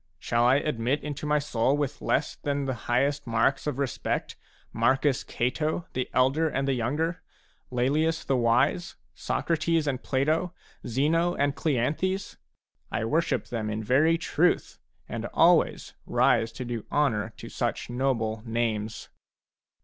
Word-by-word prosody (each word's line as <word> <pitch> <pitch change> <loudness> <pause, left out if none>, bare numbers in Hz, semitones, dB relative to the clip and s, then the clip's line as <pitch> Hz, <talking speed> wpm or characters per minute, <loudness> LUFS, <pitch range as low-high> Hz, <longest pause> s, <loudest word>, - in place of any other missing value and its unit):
Shall 120 0 +1
I 125 +2 +5
admit 140 -1 0
into 150 0 -4
my 150 0 +3
soul 140 -1 +1
with 145 -1 -3
less 150 - 0
than 140 -1 -2
the 130 - -1 0.2
highest 140 +3 +1
marks 115 +5 +1
of 145 - -2
respect 140 -3 -2 0.4
Marcus 130 +3 +2
Cato, 155 +7 -1
the 130 - -2
Elder 135 +6 +2
and 135 -1 -1
the 135 - +2
Younger, 150 +8 -1 0.5
Laelius 150 +6 +1
the 135 - +1
Wise, 120 +9 +2 0.2
Socrates 165 -1 0
and 130 -3 -1
Plato, 155 +6 0 0.3
Zeno 160 +8 +1
and 140 0 +1
Cleanthes? 155 +8 -1 0.5
I 110 - -1
worship 160 +9 0
them 110 -3 -3
in 110 +1 -3
very 145 +9 +3
truth, 175 +1 0 0.3
and - - -4
always - - +3
rise 115 - +3
to 125 +2 -6
do 120 -2 -4
honour 115 -7 +1
to - - -9
such - - -3
noble 115 -4 -1
names. 110 -2 -2
135 Hz, 140 wpm, -27 LUFS, 120-150 Hz, 0.5 s, I